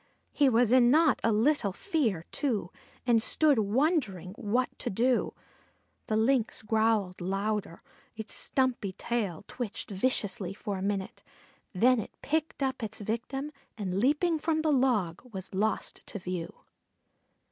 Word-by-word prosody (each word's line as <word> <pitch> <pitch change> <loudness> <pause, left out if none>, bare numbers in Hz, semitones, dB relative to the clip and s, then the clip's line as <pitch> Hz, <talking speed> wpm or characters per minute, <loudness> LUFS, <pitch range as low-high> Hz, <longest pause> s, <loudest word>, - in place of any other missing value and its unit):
He 285 -2 +4
was 235 -1 +3
in 250 -1 +6
not 305 +1 +4
a 230 - +3
little 220 0 +2
fear, 225 - -1
too, 225 - -1 0.3
and 235 -3 +4
stood 290 +1 +4
wondering 215 - 0
what 240 +2 0
to - - -2
do. 245 +5 +1 0.7
The 215 - +1
Lynx 230 0 +1
growled 215 -4 +1
louder; 195 0 -2 0.3
its 220 -1 -5
stumpy 255 -7 0
tail 205 -5 -3
twitched 230 -4 -5
viciously 195 -3 -1
for 200 -2 -4
a - - -5
minute, 195 -1 -3 0.5
then 240 +5 +4
it 215 - -8
picked 310 -1 -1
up 265 -1 -1
its 220 -1 -4
victim, 245 +7 -3 0.3
and 190 -3 -2
leaping 305 - +2
from 315 0 0
the 310 -2 +3
log 230 -11 +1
was 190 -2 -6
lost 210 +3 -1
to - - -5
view. 180 -2 -4
225 Hz, 140 wpm, -29 LUFS, 200-265 Hz, 0.7 s, in